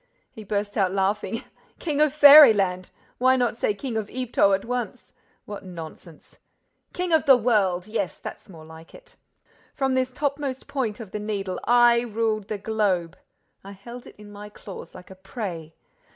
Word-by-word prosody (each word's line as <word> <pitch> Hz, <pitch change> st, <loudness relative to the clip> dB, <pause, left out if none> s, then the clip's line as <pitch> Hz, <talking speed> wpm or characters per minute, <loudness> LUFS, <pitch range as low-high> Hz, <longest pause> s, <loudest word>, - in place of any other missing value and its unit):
He 220 Hz, -, -11 dB
burst 205 Hz, +1 st, -3 dB
out 190 Hz, -3 st, +2 dB
laughing. 200 Hz, +3 st, -2 dB, 0.3 s
"King 300 Hz, -3 st, -2 dB
of 305 Hz, -1 st, +4 dB
fairyland! 230 Hz, -12 st, +7 dB, 0.3 s
Why 260 Hz, +1 st, +4 dB
not 245 Hz, -3 st, 0 dB
say 210 Hz, -3 st, -1 dB
King 235 Hz, +1 st, -5 dB
of 210 Hz, -2 st, -4 dB
Yvetot 240 Hz, -6 st, +1 dB
at 195 Hz, -, -7 dB
once? 245 Hz, 0 st, -5 dB, 0.3 s
What 205 Hz, -1 st, -8 dB
nonsense! 165 Hz, -2 st, -12 dB, 0.5 s
King 360 Hz, -1 st, -3 dB
of 315 Hz, -1 st, +2 dB
the 265 Hz, -2 st, +8 dB
world, 205 Hz, -7 st, +1 dB
yes, 210 Hz, -4 st, -3 dB
that's -, -, -10 dB
more 160 Hz, -4 st, -13 dB
like 160 Hz, +1 st, -14 dB
it! -, -, -18 dB, 0.6 s
From 270 Hz, -2 st, 0 dB
this 260 Hz, 0 st, 0 dB
topmost 280 Hz, -1 st, -3 dB
point 245 Hz, -6 st, -3 dB
of 215 Hz, -5 st, -9 dB
the 210 Hz, -, -4 dB
Needle, 200 Hz, -3 st, -4 dB
I 240 Hz, 0 st, +5 dB
ruled 220 Hz, -3 st, -2 dB
the 215 Hz, -, -4 dB
globe! 195 Hz, -5 st, -1 dB, 0.5 s
I 200 Hz, +1 st, -10 dB
held 235 Hz, +5 st, -11 dB
it -, -, -14 dB
in 210 Hz, 0 st, -13 dB
my 205 Hz, 0 st, -10 dB
claws 205 Hz, -1 st, -11 dB
like 180 Hz, +1 st, -13 dB
a -, -, -11 dB
prey! 185 Hz, -5 st, -7 dB
215 Hz, 170 wpm, -24 LUFS, 195-250 Hz, 0.6 s, the